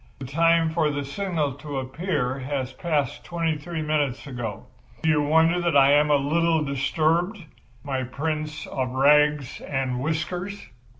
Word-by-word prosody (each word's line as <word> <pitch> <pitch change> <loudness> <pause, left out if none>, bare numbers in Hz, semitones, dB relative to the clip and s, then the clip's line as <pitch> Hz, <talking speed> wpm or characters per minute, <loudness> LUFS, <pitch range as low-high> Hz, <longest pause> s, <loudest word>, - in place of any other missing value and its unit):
The 135 - -7
time 165 +3 +3
for 160 -2 +1
the 145 -1 -3
signal 155 -1 -2
to 145 -1 -5
appear 135 -1 -2
has 130 -1 -3
passed 150 -6 -1
twenty 165 -2 -1
three 160 +1 -5
minutes 145 -4 -1
ago. 120 -7 -5 0.4
Do 160 - +2
you 150 -1 +3
wonder 160 +4 +3
that 170 -4 +2
I 135 0 +6
am 150 +1 +4
a 145 - +5
little 160 +3 +2
disturbed, 160 +7 0 0.5
my 135 -2 -2
Prince 150 +3 -3
of 130 -1 -3
Rags 150 0 +3
and 130 -3 -2
Whiskers?" 175 - -3
150 Hz, 155 wpm, -25 LUFS, 135-165 Hz, 0.5 s, I